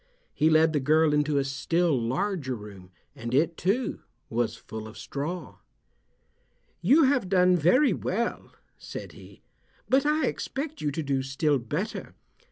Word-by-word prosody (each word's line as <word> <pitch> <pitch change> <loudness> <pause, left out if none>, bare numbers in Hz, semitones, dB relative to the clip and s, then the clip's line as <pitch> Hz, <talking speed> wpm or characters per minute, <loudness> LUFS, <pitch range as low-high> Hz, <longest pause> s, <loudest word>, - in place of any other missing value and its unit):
He 155 - +3
led 160 0 +4
the 150 - +2
girl 155 +3 +3
into 150 0 +1
a 140 - +2
still 155 +4 0
larger 130 - -1
room, 100 -4 -11 0.3
and 120 +2 -4
it, 165 +4 +2
too, 205 +10 -1 0.3
was 115 -1 0
full 110 -1 -8
of 110 - -12
straw. 160 +6 -5 1.2
"You 310 +4 +5
have 260 -8 +2
done 180 -1 +4
very 205 - +4
well," 230 +6 -3 0.3
said - - -8
he, - - -15 0.4
"but 265 +1 +3
I 305 +1 +2
expect 300 +2 -4
you 150 - 0
to 155 +3 -3
do 135 -2 0
still 135 +2 0
better. 150 - -4
155 Hz, 150 wpm, -27 LUFS, 135-190 Hz, 1.2 s, You